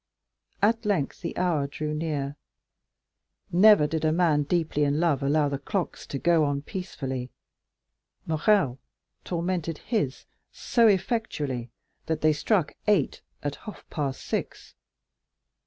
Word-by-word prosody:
At 225 +2 +3
length 195 -10 -1
the 170 - -5
hour 165 -6 +1
drew 150 +1 -4
near. 150 -3 -2 1.2
Never 195 -2 +7
did 160 +1 -2
a 155 - +3
man 160 -3 +3
deeply 155 -1 0
in 145 +1 +1
love 160 -5 +2
allow 145 +2 +2
the 140 -1 -2
clocks 185 +4 -3
to 140 - -4
go 165 +2 +3
on 145 -1 -1
peacefully. 135 -9 -5 1.0
Morrel 155 - +2 0.4
tormented 170 -2 -2
his 195 - -2 0.3
so 235 -2 +3
effectually 180 - 0 0.4
that 160 - -1
they 155 0 +4
struck 170 +2 +1
eight 200 -9 +2 0.2
at 145 -1 -3
half 215 - -11
past 140 -4 -3
six. - - -4
155 Hz, 125 wpm, -27 LUFS, 145-185 Hz, 1.2 s, Never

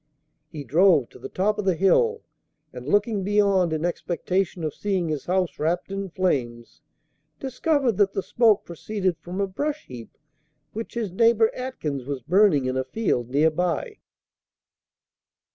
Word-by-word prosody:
He 150 -3 -7
drove 155 - +4
to - - -15
the - - -8
top 205 +3 0
of 210 - -2
the 190 -2 +2
hill, 455 - +2 0.5
and, - - -9
looking 205 -1 +1
beyond, 200 -3 +2
in 160 +1 -1
expectation 175 +1 -2
of 155 -2 -2
seeing 190 -5 -1
his 150 -3 -3
house 180 -1 -1
wrapped 175 +5 -1
in 195 0 -4
flames, 130 -12 -2 0.6
discovered 265 - 0
that 200 -2 +3
the 195 - -2
smoke 225 -4 +3
proceeded 185 +2 -2
from 180 +2 -7
a 200 - +2
brush 290 +10 -3
heap 120 -3 -11 0.6
which 225 +2 -6
his 225 -5 -2
neighbor 225 +3 +4
Atkins 155 - -4
was 135 -3 -5
burning 175 - +4
in 130 0 -1
a 130 - 0
field 130 - -1
near 150 +5 +3
by. 180 - -2
185 Hz, 155 wpm, -24 LUFS, 155-210 Hz, 0.6 s, drove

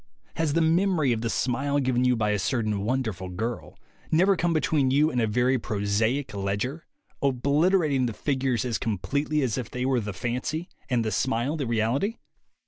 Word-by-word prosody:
Has 160 -3 0
the 165 - +2
memory 165 -3 +2
of 110 - -3
the 115 - -1
smile 135 +5 0
given 125 -2 +1
you 125 0 +4
by 105 -2 +1
a 105 - 0
certain 110 0 0
wonderful 110 -5 -2
girl 110 +7 -5 0.3
never 185 +5 +4
come 175 -1 0
between 155 -4 +2
you 150 +4 +3
and 125 - 0
a 110 - +2
very 125 +4 +2
prosaic 110 +6 -1
ledger, 100 +10 -3 0.3
obliter 145 +7 +2
ating 135 -4 +1
the 115 - -3
figures 130 -1 -1
as 120 -3 -1
completely 140 +8 -1
as 125 -2 -1
if 120 -3 -5
they 125 +1 -3
were 130 -2 +2
the 105 -2 -4
fancy 125 - -3 0.2
and 120 -3 +1
the 110 - -1
smile 125 +6 0
the 140 -6 -3
reality? 120 - 0
125 Hz, 185 wpm, -26 LUFS, 115-145 Hz, 0.3 s, you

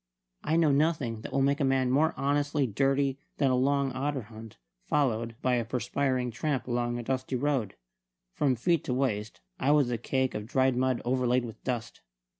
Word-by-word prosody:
I 160 - +1
know 165 -3 +4
nothing 140 -6 +1
that - - -7
will 135 - +1
make 140 +1 +2
a - - +1
man 135 -1 +2
more 155 +4 +2
honestly 145 +1 +1
dirty 135 +4 +1 0.2
than 135 -3 +2
a - - +3
long 140 +1 +1
otter 135 0 -2
hunt, 110 0 -12 0.3
followed 115 -6 0
by 125 -1 +2
a 120 - 0
perspiring 125 +2 -1
tramp 130 +1 -2
along 120 -1 -1
a 120 - -4
dusty 130 +1 -2
road. 130 -6 -1 0.6
From 135 -3 +1
feet 165 +6 +1
to 125 - -1
waist 110 -5 -2 0.2
I 135 - +1
was 145 -4 +4
a 120 - -1
cake 130 +2 0
of 105 0 -5
dried 130 0 +2
mud 130 0 0
overlaid 125 0 +1
with 115 - -10
dust. 120 -4 -4
130 Hz, 190 wpm, -29 LUFS, 120-140 Hz, 0.6 s, know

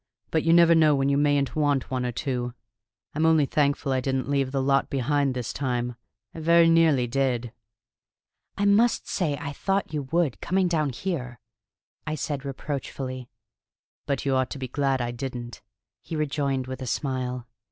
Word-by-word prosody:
But 160 - +2
you 165 - +2
never 170 0 +7
know 155 -2 +5
when 135 0 +1
you 140 - +2
mayn't 145 -2 +1
want 145 -4 +1
one 125 -1 -1
or - - -2
two. 125 -1 -3 0.6
I'm 155 - -1
only 160 -2 +4
thankful 140 0 0
I 130 - +2
didn't 130 0 -1
leave 135 -2 +1
the 135 - 0
lot 135 +1 +2
behind 140 0 0
this 125 -2 -3
time. 125 -3 -2 0.4
I - - -8
very 170 +1 +5
nearly 160 -6 +4
did." 125 -2 -1 1.1
"I 200 - +1
must 215 +4 +3
say 150 -6 -1
I 145 0 -5
thought 195 +1 -1
you 150 - -1
would, 165 -6 +1
coming 185 +1 +1
down 155 -4 +1
here," 125 - -4 0.7
I 155 - -1
said 145 -1 -4
reproachfully. 135 -2 -5 0.8
"But 140 -2 -1
you 135 - +1
ought 130 -1 +1
to - - -6
be 130 -1 -4
glad 135 0 0
I 120 0 -2
didn't," 120 -1 -6 0.4
he 165 - -6
rejoined 140 -3 -1
with 130 +1 -7
a 130 - -4
smile. 125 -2 -2
140 Hz, 175 wpm, -26 LUFS, 130-155 Hz, 1.1 s, never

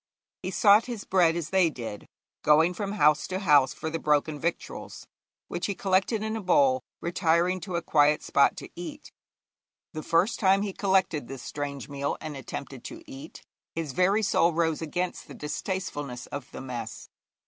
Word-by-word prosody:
He 185 - -3
sought 205 +3 +5
his 235 -4 -5
bread 175 -3 +3
as 170 -2 -4
they 190 -3 +4
did, 115 -8 -7 0.3
going 160 +4 +4
from 200 +2 -4
house 150 -7 +3
to 185 - -2
house 150 -8 +4
for 160 - -5
the 165 - -2
broken 150 0 +1
victuals, 170 +2 -4 0.4
which 175 - -3
he 200 - -2
collected 195 +4 +1
in 220 0 -2
a 220 - -3
bowl, 135 -8 +3 0.2
retiring 175 +1 +1
to 185 0 -5
a 170 - -1
quiet 150 -1 +3
spot 140 - +3
to - - -8
eat. 290 - -8 0.8
The 155 - -4
first 170 +8 +1
time 195 -1 +4
he 200 -2 -3
collected 185 - +1
this 135 -1 -8
strange 140 -4 -5
meal 140 0 -3
and 155 -2 -6
attempted 135 -1 -7
to 335 0 -8
eat, 285 +1 -11 0.3
his 160 -4 -3
very 195 +8 +2
soul 170 -3 +3
rose 160 -1 0
against 175 +3 -3
the - - -10
distastefulness 145 -5 -4
of 140 -3 -7
the - - -8
mess. 120 -5 -6
170 Hz, 175 wpm, -27 LUFS, 145-190 Hz, 0.8 s, sought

